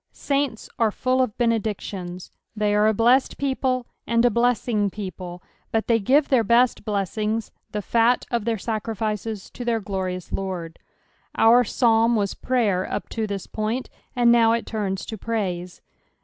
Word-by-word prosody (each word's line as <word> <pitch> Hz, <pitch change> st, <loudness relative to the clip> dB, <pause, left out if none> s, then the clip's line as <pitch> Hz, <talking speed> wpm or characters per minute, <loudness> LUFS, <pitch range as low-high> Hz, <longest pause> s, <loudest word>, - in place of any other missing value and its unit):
Saints 275 Hz, -5 st, -1 dB
are 225 Hz, -2 st, +4 dB
full 255 Hz, +4 st, 0 dB
of 235 Hz, -5 st, -1 dB
benedictions; 205 Hz, -6 st, -2 dB, 0.2 s
they 210 Hz, -1 st, +1 dB
are 210 Hz, +1 st, +4 dB
a -, -, +5 dB
blessed 240 Hz, +5 st, +3 dB
people, 260 Hz, -2 st, 0 dB, 0.2 s
and 235 Hz, 0 st, +3 dB
a 245 Hz, -, +4 dB
blessing 235 Hz, -2 st, +1 dB
people; 185 Hz, -3 st, -7 dB, 0.3 s
but 225 Hz, 0 st, 0 dB
they 230 Hz, -1 st, +3 dB
giro 265 Hz, +8 st, +4 dB
their 265 Hz, -5 st, +2 dB
best 235 Hz, +3 st, +3 dB
blessings, 210 Hz, +2 st, -2 dB, 0.2 s
the 210 Hz, -1 st, -3 dB
fat 235 Hz, +3 st, +2 dB
uf 235 Hz, -3 st, 0 dB
their 230 Hz, 0 st, 0 dB
sacnAces, 215 Hz, -1 st, -3 dB
to 245 Hz, -, -6 dB
their 235 Hz, -2 st, +1 dB
glorious 190 Hz, -3 st, -4 dB
Lord. 180 Hz, -4 st, -4 dB, 0.6 s
Our 235 Hz, +2 st, +6 dB
Paalm 230 Hz, 0 st, +3 dB
was 200 Hz, -3 st, 0 dB
prayer 215 Hz, -8 st, 0 dB
up -, -, -3 dB
to 220 Hz, -2 st, -2 dB
this 200 Hz, -2 st, -4 dB
point, 220 Hz, +4 st, -3 dB, 0.2 s
and 240 Hz, -1 st, +5 dB
now 230 Hz, -1 st, +5 dB
it 230 Hz, -, -1 dB
turns 200 Hz, -3 st, -3 dB
to 220 Hz, -, -7 dB
praise. 185 Hz, -6 st, -3 dB
225 Hz, 160 wpm, -23 LUFS, 200-235 Hz, 0.6 s, Our